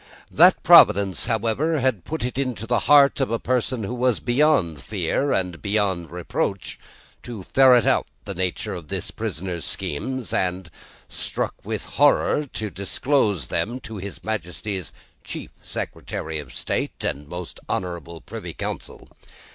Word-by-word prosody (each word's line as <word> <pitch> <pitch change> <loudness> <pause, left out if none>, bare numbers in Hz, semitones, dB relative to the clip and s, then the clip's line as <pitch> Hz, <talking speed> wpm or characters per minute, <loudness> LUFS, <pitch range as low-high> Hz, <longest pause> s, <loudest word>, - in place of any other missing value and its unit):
That - - +6
Providence, 100 +2 +6
however, 120 +8 +1
had 125 -9 0
put 160 -3 -4
it 125 +2 -2
into 125 -5 -2
the 120 +1 +2
heart 140 -1 +7
of 135 - +1
a 115 - 0
person 125 -1 -1
who 100 - -3
was 125 -2 +1
beyond 120 - +2
fear 105 - -1
and 90 -3 -1
beyond 100 -5 0
reproach, 90 +2 -3 0.4
to 115 -6 -7
ferret 125 0 +5
out - - +2 0.2
the 100 - -4
nature 90 -1 -2
of 85 -4 -7
the - - -4
prisoner's 85 -1 -4
schemes, 125 - -3
and, 90 -1 -1 0.4
struck - - -2
with - - -4
horror, 150 0 +3
to 105 -2 -4
disclose 100 - 0
them 120 - -2
to 110 -2 -8
his 95 -3 -7
Majesty's 95 -2 -4 0.3
Chief - - -6
Secretary 80 -1 -4
of 70 -4 -9
State - - -3
and 70 +1 -3
most 90 +2 -7
honourable 85 -2 -4
Privy - - -7
Council. - - -6
100 Hz, 145 wpm, -23 LUFS, 90-125 Hz, 0.4 s, heart